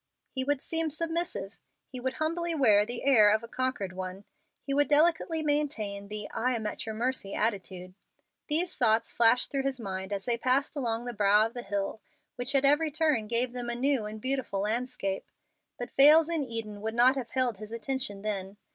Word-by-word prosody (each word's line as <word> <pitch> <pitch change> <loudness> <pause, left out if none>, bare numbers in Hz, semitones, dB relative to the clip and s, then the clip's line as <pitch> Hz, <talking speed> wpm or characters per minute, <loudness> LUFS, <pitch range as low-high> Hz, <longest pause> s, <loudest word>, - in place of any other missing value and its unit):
He 260 - -2
would 285 0 -1
seem 325 -1 -1
submissive; 330 - -4 0.3
he 255 - -5
would 260 +1 -2
humbly 335 +2 -1
wear 210 -8 +4
the 240 0 -3
air 230 -7 +6
of 215 +2 +2
a - - -7
conquered 250 -7 -2
one. 185 +1 -6 0.4
He 275 - -3
would 290 0 +3
delicately 320 +2 +2
maintain 225 -10 -2
the 210 0 -4
"I 250 +2 0
am 220 -2 -4
at 210 - -4
your 220 - -4
mercy" 235 -3 -2
attitude. 190 -4 -2 0.5
These 340 +4 0
thoughts 225 -1 +2
flashed 235 +1 +3
through 275 - 0
his 270 -1 -2
mind 190 -2 -5
as 195 -1 -3
they 235 -1 0
passed 260 +5 +1
along 235 -4 -1
the 245 - -4
brow 210 0 +4
of 225 - -5
the 245 - -5
hill, 200 +1 -3 0.3
which 245 +3 -3
at 275 0 +4
every 295 +3 +4
turn 300 -7 +1
gave 240 +2 -1
them 245 -1 -4
a 240 - -2
new 260 -3 0
and 215 +1 -7
beautiful 260 -5 -2
landscape. 220 -2 -2 0.5
But 245 - -7
vales 305 +4 +7
in 330 -3 0
Eden 220 -4 -5
would 220 +1 -3
not 250 +3 +5
have 255 -4 -4
held 250 -6 0
his 215 0 -9
attention 230 -4 -4
then. 200 -2 -4
240 Hz, 200 wpm, -29 LUFS, 210-275 Hz, 0.5 s, vales